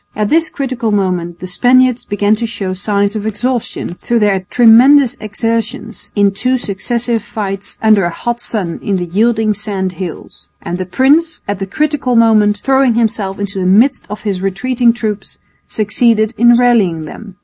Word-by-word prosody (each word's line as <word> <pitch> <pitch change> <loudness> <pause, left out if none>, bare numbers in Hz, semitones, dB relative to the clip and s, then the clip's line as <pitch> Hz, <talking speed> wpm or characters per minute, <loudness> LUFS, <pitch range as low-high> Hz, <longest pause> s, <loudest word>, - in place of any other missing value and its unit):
At 210 0 -1
this 325 0 +2
critical 255 -6 -3
moment 180 -4 -2
the - - -5
Spaniards 245 +6 +2
began 205 +1 +1
to 230 +1 -3
show 195 -4 -4
signs 200 +2 -1
of 215 0 -3
exhaustion 230 -2 -3
through 240 - 0
their 205 -3 +2
tremendous 245 +3 +5
exertions 220 0 -4
in 200 -1 +3
two 250 +6 -1
successive 235 +2 -2
fights 200 -1 -6
under 215 -3 +4
a - - 0
hot 240 +7 -4
sun 200 -8 -4
in 200 - -1
the 180 - -3
yielding 220 +4 +1
sand 195 -3 -3
hills; 180 -1 -8
and 175 +2 -5
the 185 - -4
prince, 295 - +1
at 205 -1 -3
the 195 - -4
critical 295 0 -1
moment, 215 -2 +4
throwing 265 -3 +2
himself 210 -4 -1
into 200 -1 -4
the 185 - -1
midst 235 +8 +3
of 210 - -7
his 195 -4 -3
retreating 235 +6 +1
troops, 215 -4 -5 0.3
succeeded 220 +1 +1
in 240 +1 +5
rallying 210 -10 +2
them. 200 +5 -11
215 Hz, 170 wpm, -14 LUFS, 195-240 Hz, 0.3 s, tremendous